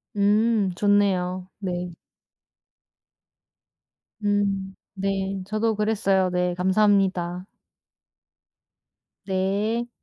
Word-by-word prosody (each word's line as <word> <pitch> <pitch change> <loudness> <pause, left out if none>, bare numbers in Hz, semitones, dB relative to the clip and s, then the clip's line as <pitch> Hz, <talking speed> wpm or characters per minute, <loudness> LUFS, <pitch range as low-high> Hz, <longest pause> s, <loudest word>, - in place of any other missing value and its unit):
음. 210 0 +2
좋네요. 185 -2 +1
네. 180 -2 -3 2.3
음. 200 -2 0 0.2
네. 195 0 -2
저도 215 +2 0
그랬어요. 200 -3 +1
네. 180 0 0
감사합니다. 185 -2 +1 1.8
네. 205 +5 -1
195 Hz, 120 characters per minute, -24 LUFS, 185-205 Hz, 2.3 s, 음